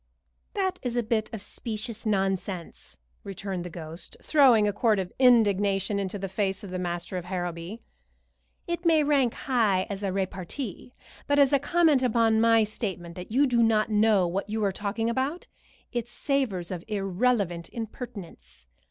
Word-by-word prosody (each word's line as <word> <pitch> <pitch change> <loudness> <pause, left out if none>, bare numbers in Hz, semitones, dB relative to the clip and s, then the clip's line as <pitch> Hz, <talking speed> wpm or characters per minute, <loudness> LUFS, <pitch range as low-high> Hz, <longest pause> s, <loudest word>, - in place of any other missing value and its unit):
"That 380 -2 -1
is 245 -2 -3
a 240 - +1
bit 220 -1 -1
of 220 -4 -6
specious 225 0 -5
nonsense," 195 -3 -2 0.3
returned 195 -2 -5
the 180 - -6
ghost, 165 0 -8
throwing 255 -8 +5
a 205 - 0
quart 215 0 +2
of 185 -2 -3
indignation 205 -5 +3
into 195 +1 -3
the 195 0 -4
face 195 0 -2
of 195 - -8
the 185 - -3
master 175 +1 -3
of 180 - -5
Harrowby. 175 +3 -5 0.8
"It 345 -1 -3
may 325 -3 +4
rank 275 -5 +2
high 215 -8 +1
as 200 0 -5
repartee, 195 +4 -4 0.3
but 285 - +2
as 280 -1 +5
a 280 - +5
comment 310 -1 +3
upon 225 -3 +3
my 225 -1 +5
statement 190 -5 -4
that 180 +3 -9
you 270 +5 +4
do 240 -3 +2
not 220 -1 +3
know 210 -3 +4
what 190 +4 -3
you 215 0 -1
are 200 - +2
talking 210 +3 -2
about, 265 +8 -1 0.5
it 240 -2 -2
savors 240 - -1
of 175 -2 -5
irrelevant 195 -3 0
impertinence. 200 - -8
210 Hz, 160 wpm, -27 LUFS, 185-240 Hz, 0.8 s, throwing